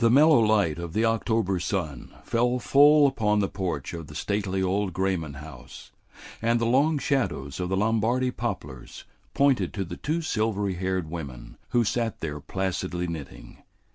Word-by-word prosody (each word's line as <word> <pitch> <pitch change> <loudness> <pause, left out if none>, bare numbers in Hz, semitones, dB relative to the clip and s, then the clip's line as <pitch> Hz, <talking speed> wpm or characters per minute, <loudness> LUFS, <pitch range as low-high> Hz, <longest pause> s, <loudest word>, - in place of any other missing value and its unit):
The 115 - +5
mellow 150 +4 +6
light 105 -8 +2
of 85 -2 -6
the 110 +3 +2
October 110 -4 +1
sun 80 -7 -3
fell 120 +2 +1
full 145 +3 +6
upon 105 -6 +1
the 100 -1 +2
porch 90 -9 -4
of 85 -2 -7
the 75 - -11
stately 100 +1 -1
old 95 0 0
Grayman 90 -6 -1
house, 70 -3 -11 0.5
and 115 +1 +2
the 115 - 0
long 140 +6 +3
shadows 120 - -1
of 90 -1 -2
the 95 - 0
Lombardy 115 +4 +1
poplars 90 - -6 0.3
pointed 140 -2 +2
to 100 -2 -2
the - - -7
two 165 +3 -2
silvery 105 -7 0
haired 95 -1 -2
women 70 -8 -7
who 120 - +3
sat 115 0 -1
there 75 -2 -4
placidly 90 0 -3
knitting. 80 -4 -8
100 Hz, 165 wpm, -26 LUFS, 85-115 Hz, 0.5 s, mellow